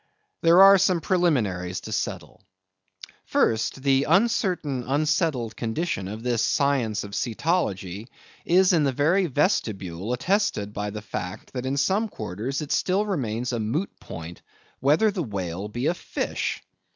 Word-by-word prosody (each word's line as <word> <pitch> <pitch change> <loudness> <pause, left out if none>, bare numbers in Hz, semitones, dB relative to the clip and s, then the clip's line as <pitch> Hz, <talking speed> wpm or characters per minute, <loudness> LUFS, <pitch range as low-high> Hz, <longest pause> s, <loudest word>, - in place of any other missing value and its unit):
There 170 +3 +7
are 195 0 +8
some 185 -2 +3
preliminaries 110 - 0
to - - -8
settle. - - -4 0.8
First: 115 +4 0
The 135 0 +3
uncertain, 185 - +1
unsettled 145 - 0
condition 115 - -2
of 110 +3 -7
this 120 -2 0
science 135 -7 +1
of 100 - -8
Cetology 110 - -2 0.4
is 185 +2 +4
in 160 -3 +3
the 140 - +2
very 175 +8 +2
vestibule 110 - -1
attested 125 - 0
by 105 0 -3
the 105 0 -7
fact, 90 -3 -6
that 130 0 -3
in 135 +1 -1
some 190 +11 +1
quarters 110 - -4
it 145 - -7
still 195 +3 +1
remains 125 - -2
a 120 - -1
moot 130 - -2
point 85 +1 -9 0.4
whether 155 +11 +3
a 185 - -1
whale 95 - -4
be 120 +5 -4
a 165 - +3
fish. - - -3
135 Hz, 145 wpm, -25 LUFS, 105-175 Hz, 0.8 s, are